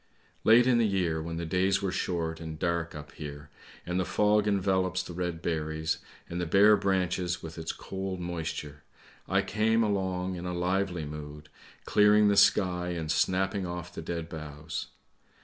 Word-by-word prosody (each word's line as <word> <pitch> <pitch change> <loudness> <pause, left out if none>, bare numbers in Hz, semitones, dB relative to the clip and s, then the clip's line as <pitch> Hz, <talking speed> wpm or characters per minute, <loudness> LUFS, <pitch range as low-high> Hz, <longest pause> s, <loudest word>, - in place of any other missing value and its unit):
" - - -34
Late 115 +2 +7
in 125 -2 +4
the 115 - +4
year 90 -5 0
when 80 +1 -5
the 85 - -3
days 95 +3 +1
were 95 - 0
short 80 -3 -2
and 80 -1 -6
dark 85 -1 -1
up 75 -2 -9
here, 75 -1 -9 0.3
and 90 +1 -1
the - - +2
fog 105 +2 +2
envelops 95 -2 +1
the 90 - -8
red 85 -1 -3
berries 80 -1 -1 0.3
and 85 -1 -3
bare 105 +4 +7
branches 90 -3 0
with 80 -1 -7
its 80 - -3
cold 95 -1 -5
moisture, 80 -4 -5 0.5
I - - +3
came 110 +2 +2
along 95 -3 -1
in 85 - -6
a 90 - -3
lively 90 -1 0
mood, 75 0 -8 0.4
clearing 105 0 +5
the 100 - +3
sky 90 -3 +3
and 80 -2 -2
snapping 95 +2 +1
off 90 0 -6
the - - -6
dead 85 0 -4
boughs. 75 -1 -6
90 Hz, 170 wpm, -29 LUFS, 80-95 Hz, 0.5 s, Late